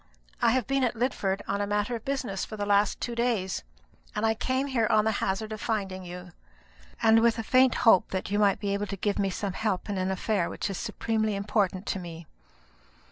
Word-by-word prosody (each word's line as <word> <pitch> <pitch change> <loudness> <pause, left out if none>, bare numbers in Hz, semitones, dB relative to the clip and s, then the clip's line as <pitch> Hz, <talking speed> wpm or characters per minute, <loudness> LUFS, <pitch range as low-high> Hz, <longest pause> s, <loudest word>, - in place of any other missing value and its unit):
I - - +5
have 255 -3 +1
been 275 +1 +1
at 240 -1 +1
Lidford 205 -5 -1
on 200 +1 -1
a 205 - -1
matter 210 +3 0
of 225 - -7
business 255 -8 -2
for 215 - -6
the 205 - -2
last 205 0 +2
two 240 - -3
days; 235 -6 0 0.5
and 210 +1 0
I 220 - +3
came 260 +4 -1
here 245 -5 +1
on 215 -1 +4
the 220 - +3
hazard 200 +3 -1
of 215 - -7
finding 195 -4 -2
you, 180 0 -9 0.7
and 225 0 +6
with 235 0 +3
a 225 - -2
faint 255 +2 +4
hope 225 -5 +6
that 190 0 -3
you 205 - +1
might 200 -2 +3
be 200 -1 -1
able 205 +1 -2
to 195 - -5
give 205 +2 -1
me 195 -1 +1
some 195 +1 -3
help 205 -1 -2
in 195 - -2
an 185 0 0
affair 190 -1 0
which 200 - -3
is 190 - -4
supremely 220 -2 -1
important 200 -1 0
to 195 - -2
me." 170 -2 -8
205 Hz, 225 wpm, -28 LUFS, 195-225 Hz, 0.7 s, and